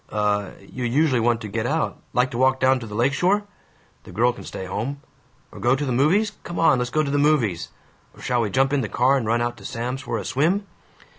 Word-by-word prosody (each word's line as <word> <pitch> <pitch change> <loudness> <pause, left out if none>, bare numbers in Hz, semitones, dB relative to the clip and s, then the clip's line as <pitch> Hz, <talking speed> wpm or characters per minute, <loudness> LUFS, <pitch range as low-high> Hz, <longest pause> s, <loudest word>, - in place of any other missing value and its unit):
"Uh 105 -2 0
You 110 +6 -8
usually 130 +2 +2
want 115 0 +1
to 110 - -5
get 110 +3 -2
out. 155 +3 -1
Like 125 +1 +1
to 120 - -4
walk 130 0 +3
down 130 0 +3
to 115 - -8
the 105 - -8
lake 125 +5 +2
shore? 190 +8 +2 0.6
(The - - -12
girl 120 +6 +2
can - - -11
stay 95 - -7
home.) 120 +9 -4 0.5
Or 105 - -11
go 120 +5 +3
to 145 +2 -2
the 130 - -2
movies? 170 - +2
Come 175 - -7
on, 135 -6 +4
let's 125 0 -1
go 155 +3 +1
to 140 - -2
the 145 - +1
movies! 135 - +1 0.5
Or - - -17
shall 120 -1 0
we 110 - -1
jump 135 +7 +2
in 145 - +2
the - - -3
car 130 +3 +3
and 125 -5 -1
run 120 +1 +1
out 120 0 -3
to 100 - -14
Sam's, 125 +3 -4
for 120 -3 -3
a 100 - -5
swim?" 175 +9 +1
125 Hz, 250 wpm, -23 LUFS, 115-140 Hz, 0.6 s, on